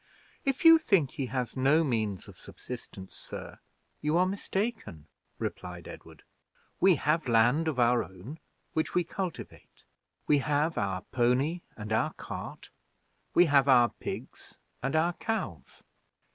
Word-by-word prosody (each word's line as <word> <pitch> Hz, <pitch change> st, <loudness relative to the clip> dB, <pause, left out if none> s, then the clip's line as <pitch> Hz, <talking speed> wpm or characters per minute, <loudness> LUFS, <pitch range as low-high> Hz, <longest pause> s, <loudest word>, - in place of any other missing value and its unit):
"If 275 Hz, +3 st, -1 dB
you 325 Hz, 0 st, +10 dB
think 175 Hz, -, +2 dB
he 135 Hz, -, -3 dB
has 125 Hz, -2 st, -3 dB
no 140 Hz, +5 st, +4 dB
means 110 Hz, -, -2 dB
of -, -, -14 dB
subsistence, 95 Hz, 0 st, -9 dB
sir, -, -, -9 dB, 0.4 s
you 150 Hz, +2 st, +1 dB
are 180 Hz, -, +4 dB
mistaken," 200 Hz, -, -3 dB, 0.3 s
replied 90 Hz, -1 st, -6 dB
Edward. -, -, -12 dB, 0.6 s
"We 190 Hz, -1 st, +6 dB
have 150 Hz, +2 st, 0 dB
land 120 Hz, +8 st, +3 dB
of 145 Hz, -5 st, -1 dB
our 120 Hz, 0 st, +4 dB
own, 95 Hz, -, -10 dB, 0.3 s
which 160 Hz, -, -1 dB
we 180 Hz, -, +3 dB
cultivate; 180 Hz, 0 st, -7 dB, 0.4 s
we 145 Hz, -, +4 dB
have 150 Hz, +4 st, 0 dB
our 95 Hz, -2 st, -1 dB
pony 130 Hz, +8 st, +1 dB, 0.2 s
and 110 Hz, 0 st, -4 dB
our 110 Hz, -, +1 dB
cart; -, -, -8 dB, 0.6 s
we 175 Hz, -, +7 dB
have 140 Hz, -3 st, +4 dB
our 120 Hz, -2 st, +6 dB
pigs -, -, -8 dB, 0.2 s
and 135 Hz, +5 st, -1 dB
our 170 Hz, +2 st, +2 dB
cows." 85 Hz, -, -5 dB
140 Hz, 140 wpm, -29 LUFS, 120-170 Hz, 0.6 s, you